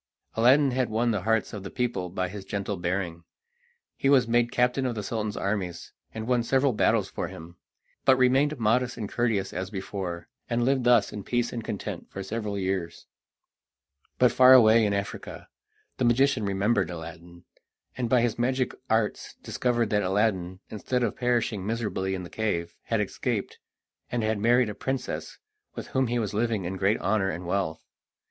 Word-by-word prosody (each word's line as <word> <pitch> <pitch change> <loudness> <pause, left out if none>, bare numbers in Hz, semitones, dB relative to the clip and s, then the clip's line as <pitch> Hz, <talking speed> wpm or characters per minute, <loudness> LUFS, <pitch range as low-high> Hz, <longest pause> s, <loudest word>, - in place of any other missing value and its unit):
Aladdin 130 +5 +4
had 125 0 0
won 115 +2 +1
the 105 -4 -1
hearts 115 +2 0
of 105 - -5
the 95 - -7
people 120 -7 -2
by 95 +1 -2
his 100 +2 -8
gentle 100 +1 -3
bearing. 85 -1 -3 0.7
He 135 - 0
was 130 -4 +5
made 120 0 +2
captain 125 +2 +1
of 120 - -3
the 105 - -4
Sultan's 105 0 -3
armies, 95 -3 -3 0.2
and 110 0 -6
won 125 0 +2
several 130 +2 +2
battles - - +2
for - - -4
him, 85 +2 -11 0.5
but 130 - +6
remained 135 +4 +3
modest 125 +3 +1
and 105 - -4
courteous 110 -4 -1
as 95 +1 -4
before, 95 -3 -5 0.2
and 120 0 +1
lived 130 -1 +1
thus 120 -4 +4
in 105 - -6
peace 120 +2 -1
and 115 -2 -4
content - - -5
for 95 - -6
several 105 0 -3
years. 95 -3 -3 1.1
But 125 -2 +5
far 130 +2 +7
away 115 -3 +7
in 100 - 0
Africa 100 0 -5 0.5
the 130 - +1
magician 125 -1 +3
remembered 100 +1 +1
Aladdin, 85 +1 -9 0.5
and 120 -2 -2
by 125 -1 +4
his 120 -1 0
magic 130 +1 0 0.2
arts 110 -1 0
discovered 120 -3 0
that 105 -1 +2
Aladdin, 95 -2 0
instead 125 +4 -1
of 115 - -1
perishing 120 -5 0
miserably 105 -3 -2
in 90 - -5
the 85 - -10
cave, 85 -6 -2
had - - 0
escaped, - - -3 0.5
and 120 -2 -1
had 110 -1 0
married 120 +2 +3
a - - -4
princess, 130 +4 -4 0.4
with - - -7
whom 130 -1 +1
he 120 +1 -1
was 110 -4 -2
living 110 -3 0
in 95 +2 -3
great 100 +3 +2
honour 100 -2 +1
and 90 +1 -5
wealth. 85 -3 -2
110 Hz, 180 wpm, -27 LUFS, 95-120 Hz, 1.1 s, far